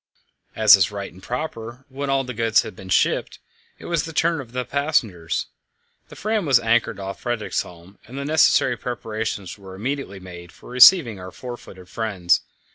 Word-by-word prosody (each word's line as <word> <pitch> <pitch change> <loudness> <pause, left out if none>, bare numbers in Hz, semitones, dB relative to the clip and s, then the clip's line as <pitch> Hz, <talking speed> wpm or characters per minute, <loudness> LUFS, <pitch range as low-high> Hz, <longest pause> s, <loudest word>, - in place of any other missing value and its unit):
As 110 -2 +8
is 95 -4 +2
right 100 -1 -7
and 95 - -15
proper, 125 0 -6
when 140 +1 -5
all 135 0 +2
the 125 -1 -6
goods 115 -1 +2
had - - -9
been 95 0 -11
shipped, - - +1 0.4
it - - -13
was 170 -3 0
the 165 - -7
turn 165 0 +1
of 120 -3 -13
the 125 0 -3
passengers. 125 - -1 0.6
The - - -12
Fram 215 -1 -1
was 135 -6 +4
anchored 115 -2 +1
off 95 0 -6
Fredriksholm, 100 -6 -4
and 130 +4 -9
the 140 - -4
necessary 150 -4 +3
preparations 110 -5 -5
were 95 -1 -11
immediately 125 -2 -4
made 90 -2 -11
for - - -15
receiving 125 - +7
our 90 0 -8
four 120 +5 -8
footed 95 -6 -14
friends. 95 -4 0
115 Hz, 180 wpm, -22 LUFS, 95-135 Hz, 0.6 s, As